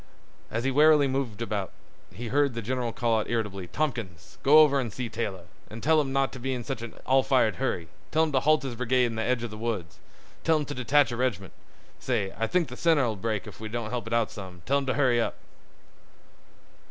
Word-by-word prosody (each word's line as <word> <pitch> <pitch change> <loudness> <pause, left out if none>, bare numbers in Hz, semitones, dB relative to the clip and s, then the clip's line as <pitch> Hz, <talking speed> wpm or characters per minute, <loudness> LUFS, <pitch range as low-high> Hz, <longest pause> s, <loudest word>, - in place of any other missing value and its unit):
As 115 +1 -2
he 135 - +1
warily 150 +1 +5
moved 130 -5 -2
about, 105 -4 -3 0.4
he 115 +4 -6
heard 140 -1 +2
the 115 - -4
general 125 +1 -2
call 115 -1 +1
out 105 - -4
irritably: 105 -5 -2
"Tompkins, 120 - -4
go 145 +3 +6
over 150 -3 +6
an' 125 -3 -2
see 120 +3 -5
Taylor, 100 -6 -4 0.3
an' 110 - -8
tell 155 +4 +3
him 135 -2 -3
not 135 0 +1
t' 130 - -8
be 130 +2 -2
in 120 - -5
such 110 - -4
an 115 -1 -7
all 135 0 +4
fired 130 -4 +2
hurry; 90 -10 -2 0.2
tell 160 +1 +3
him 160 - 0
t' 135 - +3
halt 155 +3 +3
his 135 -3 -4
brigade 125 +1 +2
in 115 -2 -3
th' - - -3
edge 120 +1 0
of 120 - -4
th' 110 - -8
woods; 110 -7 -4 0.4
tell 160 -1 +3
him 150 - -2
t' 145 - -5
detach 135 0 +3
a - - -2
reg'ment—say 100 -3 -4
I 115 +2 -1
think 180 +2 +1
th' 125 - -9
center 160 -6 +3
'll 110 - -2
break 105 -1 -2
if - - -11
we 110 0 -6
don't 115 -1 -4
help 120 -3 -3
it 115 - -3
out 115 -2 +1
some; 90 -4 -9
tell 140 +1 +2
him 135 - -5
t' 130 - +1
hurry 125 -4 +3
up." - - -2
120 Hz, 235 wpm, -27 LUFS, 110-135 Hz, 0.4 s, go